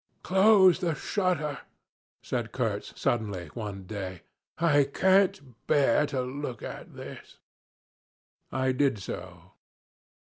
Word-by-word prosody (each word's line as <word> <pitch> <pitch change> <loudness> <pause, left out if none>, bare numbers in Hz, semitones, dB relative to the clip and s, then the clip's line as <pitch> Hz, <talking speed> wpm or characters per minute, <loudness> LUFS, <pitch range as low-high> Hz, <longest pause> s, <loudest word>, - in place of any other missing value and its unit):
'Close 190 -1 +6
the 170 -3 0
shutter,' 155 -9 -1 0.6
said - - -3
Kurtz - - -2
suddenly 100 -8 -1
one 105 -4 -6
day; 95 -2 -6 0.3
'I 150 -4 +4
can't 185 - +2
bear 145 -1 +3
to 135 -3 -2
look 130 -2 -5
at - - -8
this.' - - -10 1.1
I 130 0 +1
did 130 -2 +2
so. 90 -2 -8
135 Hz, 105 wpm, -28 LUFS, 105-165 Hz, 1.1 s, Close